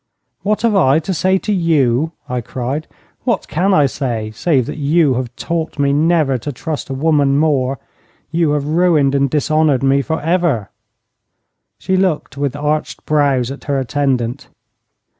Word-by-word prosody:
'What 210 +2 -1
have 225 -3 +2
I 140 -7 +4
to 165 +4 -2
say 185 +3 +2
to 210 +2 -2
you?' 155 -5 +2 0.2
I 125 -1 -2
cried. 130 +6 -4 0.4
'What - - -1
can 185 +5 0
I 150 -6 +4
say, 120 -6 -3
save 130 +2 +1
that - - -6
you 150 0 +3
have 125 -1 -4
taught 165 +1 -3
me 140 -1 +2
never 150 -3 +2
to 145 - -5
trust 150 +3 -5
a 135 - -3
woman 140 -1 +2
more? 140 -3 +1 0.5
You 165 -2 +1
have 145 -1 -1
ruined 155 -3 +2
and 140 0 +2
dishonoured 150 -1 +1
me 135 +1 +3
for 160 +4 -2
ever.' 160 - 0 1.1
She 190 - -1
looked 185 -7 0
with 140 -1 -2
arched 150 +1 -2
brows 140 -4 +1
at 140 - -9
her 140 -2 0
attendant. 130 -1 -1
145 Hz, 160 wpm, -17 LUFS, 135-160 Hz, 1.1 s, I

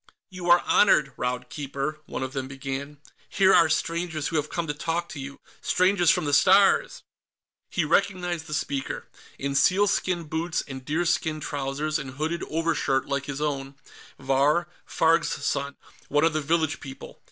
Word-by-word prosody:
"You 180 -1 -5
are 175 0 +6
honored, 150 -9 +4
Raud 125 0 -3
Keeper," 140 +3 -4
one - - -4
of 130 0 -5
them 135 -1 -3
began. 135 +2 -6 0.3
"Here 190 -1 +4
are 170 -2 +6
strangers 165 -1 -1
who - - -5
have 150 0 -1
come 170 - -2
to 150 - -2
talk 165 +3 -2
to 150 - -8
you. 140 +1 -7 0.2
Strangers 185 -1 +3
from 180 -2 +3
the 145 - -1
Stars!" 200 - +4 0.7
He 175 - 0
recognized 175 -1 0
the 150 - -3
speaker, 140 -2 -3 0.3
in 140 0 -3
sealskin 185 +2 +2
boots 160 +2 -2
and 130 -2 -7
deerskin 160 +1 0
trousers 145 +2 -2
and 135 -2 -7
hooded 160 +4 -2
overshirt 160 -4 0
like 140 0 -2
his 140 0 -4
own 140 -2 -3 0.4
Vahr 140 +5 +2 0.2
Farg's 165 +1 +2 0.2
son, 140 0 -1 0.3
one 145 +1 +2
of 165 -1 +3
the 155 - 0
village 160 +1 0
people. 135 -3 -10
155 Hz, 165 wpm, -26 LUFS, 140-170 Hz, 0.7 s, are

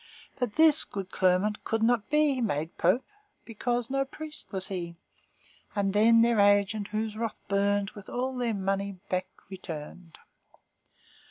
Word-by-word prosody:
But 245 -4 -2
this 315 -1 +6
good 195 -2 -6
Clermont 190 +3 +1
could 225 0 -1
not 235 -2 +2
be 300 -3 +2
Made 160 -7 -2
pope, 185 +10 +2 0.4
because 240 +2 -2
no 275 0 +2
priest 305 +3 -9
was 190 -2 -4
he; 175 -3 -4 0.8
And 195 -1 0
then 230 +2 +6
their 235 -2 +3
agent, 205 +1 +3
whose 215 0 -3
wrath 225 0 -3
burned, 200 0 +1
With 205 -1 -12
all 255 +2 -2
their 240 -3 -1
money 195 0 -1 0.2
back 185 0 0 0.2
returned." 170 -2 -9
210 Hz, 145 wpm, -28 LUFS, 195-240 Hz, 0.8 s, this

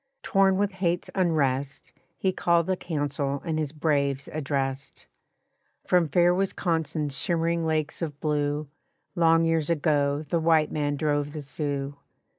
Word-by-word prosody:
Torn 195 -2 +3
with 205 0 +1
hate's 180 -2 -1
unrest 140 -7 0 0.3
He 190 - +1
called 170 -2 +2
a - - +2
council 145 -4 -2
and 160 -2 -1
his 150 -3 -2
braves 145 -3 0
addressed. 135 -2 -3 0.8
"From 180 -2 +3
fair 175 +4 +4
Wisconsin's 165 -6 -1
shimmering 165 +2 +1
lakes 155 +1 -1
of 150 -4 -4
blue 150 0 -1 0.5
Long 165 -2 +4
years 165 -2 +1
ago 145 -2 +1
the 170 +3 0
white 160 -1 +3
man 145 -1 -1
drove 145 -1 -1
the 150 -2 -6
Sioux. 140 -1 -4
155 Hz, 135 wpm, -26 LUFS, 145-170 Hz, 0.8 s, fair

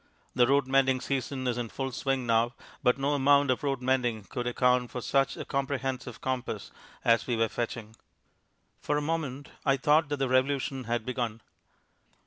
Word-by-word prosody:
The 120 -1 +4
road 140 +1 +3
mending 130 -1 +3
season 135 0 -3
is 120 -1 0
in 120 -2 -3
full 135 +2 -4
swing 135 0 -1
now, 115 +1 +2 0.3
but 125 +1 +3
no 140 +2 0
amount 140 0 +4
of 125 - -1
road 135 -3 -1
mending 125 -4 +1
could 120 +5 -4
account 125 0 +2
for 125 - -5
such 135 +2 +1
a - - -5
comprehensive 135 -3 -3
compass 130 -2 -3 0.3
as 115 0 +3
we 120 - +1
were 115 0 +2
fetching. 115 -2 -4 0.8
For 145 - -1
a - - 0
moment 145 -3 -3
I 135 -1 +3
thought 150 +2 +3
that 145 - -1
the 135 -1 0
revolution 130 0 +1
had 115 -1 -1
begun. 120 -3 -3
130 Hz, 175 wpm, -29 LUFS, 120-135 Hz, 0.8 s, The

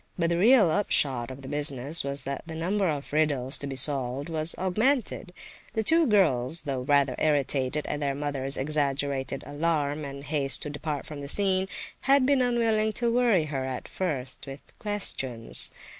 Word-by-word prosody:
But 170 -1 0
the 170 - 0
real 215 -4 +5
upshot 135 -11 0
of 130 +1 -10
the - - -9
business 145 +1 +2
was 140 0 -2
that 140 0 -5
the 160 - -7
number 190 +4 -1
of 145 -3 -4
riddles 145 -4 +1
to 140 - -5
be 135 - -6
solved 135 +1 +2
was 160 0 0
augmented. 215 +2 -1 0.4
The 220 - 0
two 325 +6 +3
girls, 160 - +1
though 135 -4 -3
rather 140 0 +1
irritated 145 -1 0
at 150 - -4
their 140 -2 -2
mother's 140 -1 +1
exaggerated 140 -1 -2
alarm 150 -1 -2
and 140 -1 -8
haste 145 -2 +1
to 150 - -5
depart 145 -1 -5
from 150 -2 -8
the 140 - -7
scene, 190 +3 +1 0.3
had 275 -1 +3
been 275 -1 +2
unwilling 225 -3 0
to 235 0 -1
worry 235 -9 +2
her 135 -1 -2
at 130 -1 -6
first 135 -7 -4
with 135 +1 -11
questions. 135 - +4
150 Hz, 175 wpm, -26 LUFS, 135-190 Hz, 0.4 s, real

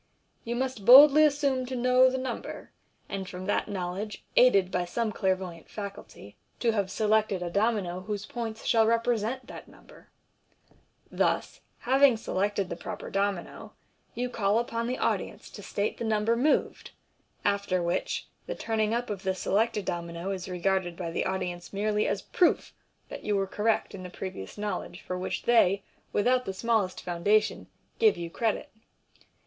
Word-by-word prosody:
You 235 +1 -3
must 255 -4 -2
boldly 280 +6 +9
assume 280 -3 +1
to 260 - -4
know 255 +1 +5
the 260 - -2
number, 255 -2 -5 0.4
and 195 -1 -5
from 185 0 -7
that - - 0
knowledge, 195 +2 -4
aided 200 -7 +5
by 180 0 0
some 220 +5 -2
clairvoyant 185 -5 -2
faculty, 200 - -9 0.2
to 235 - +2
have 200 -3 -1
selected 210 -3 +1
a 175 - -4
domino 200 -3 0
whose 205 +2 -4
points 225 -2 -6
shall 225 -2 +4
represent 230 +2 0
that - - -10
number. - - -18 1.0
Thus, - - 0 0.2
having 265 -1 +4
selected 200 -2 -1
the - - -5
proper - - -7
domino, 195 -2 -2 0.4
you 250 +1 -1
call 210 -3 +1
upon 230 0 -1
the 255 - -2
audience - - -2
to - - -9
state 205 +1 -2
the - - -3
number 220 +1 +1
moved, 275 +6 +1 0.6
after 200 -3 +1
which 170 0 -2 0.2
the - - -3
turning 220 0 0
up 240 -2 -2
of 200 -2 -4
the 190 -1 -1
selected 210 +2 0
domino 170 +1 -4
is 185 -1 -5
regarded 180 -1 -1
by 170 -3 -4
the - - -1
audi 185 -1 -1
ence 175 0 -11
merely 210 +1 0
as - - -1
a - - -24
proof 355 - +3 0.4
that - - -8
you 210 - 0
were 195 -1 +1
correct 210 +3 0
in 195 - -7
the 180 - -7
previous 180 - -7
know 210 0 -2
ledge - - -10
for 180 - -5
which 180 +1 -3
they, 200 -5 +4 0.3
without 250 +4 +2
the 190 - -4
smallest 220 -3 0
foundation, 200 +5 +1 0.3
give 440 -1 +5
you 170 -1 -5
credit. 225 +3 -1
210 Hz, 165 wpm, -28 LUFS, 185-235 Hz, 1.0 s, boldly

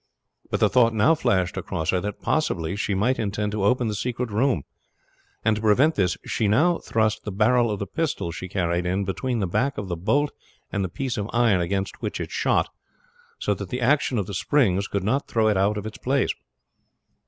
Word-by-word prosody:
But - - -1
the - - +5
thought 115 -3 +3
now 110 +10 +5
flashed 95 - 0
across 80 -4 -2
her 90 - +1
that 105 +1 -5
possibly 95 - 0
she 100 -1 -1
might 120 +7 +1
intend 105 0 -1
to 105 -2 -2
open 125 +3 +2
the 105 - -1
secret 120 +2 -3
room; 110 - +1 0.8
and 110 - +4
to 105 - -4
prevent 125 +9 +4
this 90 - 0
she 110 - 0
now 155 +12 +3
thrust 110 -1 0
the 105 - -4
barrel 115 +4 +3
of 105 - -1
the 100 - -3
pistol 115 - -2
she 90 +3 -6
carried 90 -2 -1
in 95 +2 0
between 120 +5 -2
the - - +1
back 135 +10 0
of 100 -2 -4
the 85 - -1
bolt 140 - +1 0.4
and 100 - -1
the 95 - -2
piece 130 +6 -3
of 105 +1 -3
iron 115 -6 +3
against 95 +3 -2
which - - -3
it - - -5
shot, - - +1 0.7
so - - 0
that - - -7
the 125 - -3
action 130 0 +2
of 100 - 0
the 100 - -7
springs 100 -3 +2
could 100 -2 -2
not 130 +8 0
throw 110 -1 +2
it 105 - +2
out 100 +2 +2
of 105 - -5
its 110 - -7
place. 135 +1 +1
105 Hz, 215 wpm, -24 LUFS, 95-125 Hz, 0.8 s, the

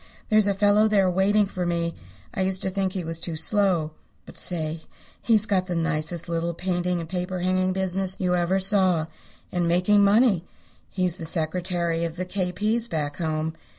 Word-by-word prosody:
There's 215 -1 +4
a 200 - +1
fellow 205 +2 +4
there 195 -3 +3
waiting 200 +3 +3
for 185 -2 -4
me. 170 -1 -1 0.4
I - - -2
used 190 0 +1
to 190 - -1
think 190 -1 -1
he 185 - -3
was 165 0 -3
too 170 -1 -4
slow. 175 -2 +1 0.3
But - - -13
say, 160 -2 -1 0.4
he's 215 -3 +3
got 190 -4 0
the 180 - -3
nicest 165 0 -1
little 170 0 -2
painting 180 0 -1
and 165 - -6
paper 180 +1 -3
hanging 185 +1 +1
business 190 0 0
you 180 -1 0
ever 175 +2 +1
saw, 185 -4 +3 0.5
and 175 -1 0
making 180 +4 +3
money. 205 -3 +4 0.5
He's 185 -2 0
secretary 170 0 -1
of 165 -1 -3
the 185 +1 -4
K. 180 -1 -2
P.'s 215 +5 0
back 145 -7 -3
home. 160 -1 -2
180 Hz, 180 wpm, -24 LUFS, 170-195 Hz, 0.5 s, There's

